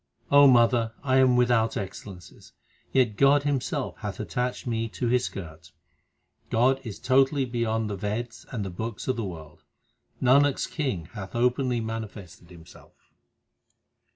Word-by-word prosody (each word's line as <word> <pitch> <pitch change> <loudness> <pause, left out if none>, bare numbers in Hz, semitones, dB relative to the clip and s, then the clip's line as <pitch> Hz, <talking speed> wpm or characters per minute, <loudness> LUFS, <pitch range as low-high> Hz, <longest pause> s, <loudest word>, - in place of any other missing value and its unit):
O 145 0 +8
mother, 120 -2 +4
I 130 -2 +2
am 130 -1 +5
without 120 -2 +2
excellences, 95 -2 -9 0.4
yet 120 -6 +2
God 140 +1 +4
Himself 145 -3 -2
hath - - -6
attached 125 0 -3
me 115 -2 -2
to 120 +2 -3
His 125 +1 +2
skirt. 80 -3 -9 0.8
God 130 +4 +2
is 110 -5 -7
totally 135 +2 +2
beyond 115 -2 -1
the 105 - -3
Veds 110 +4 -5
and 105 -5 -3
the 95 - -5
books 110 +4 -6
of 130 - +1
the 115 - -3
world; 80 -6 -9 0.6
Nanak 140 +2 +4
s - - -2
King 130 - -3
hath 95 -2 -8
openly 125 0 +1
manifested 110 -6 -7
Himself. 85 -2 -17
120 Hz, 145 wpm, -26 LUFS, 105-130 Hz, 0.8 s, O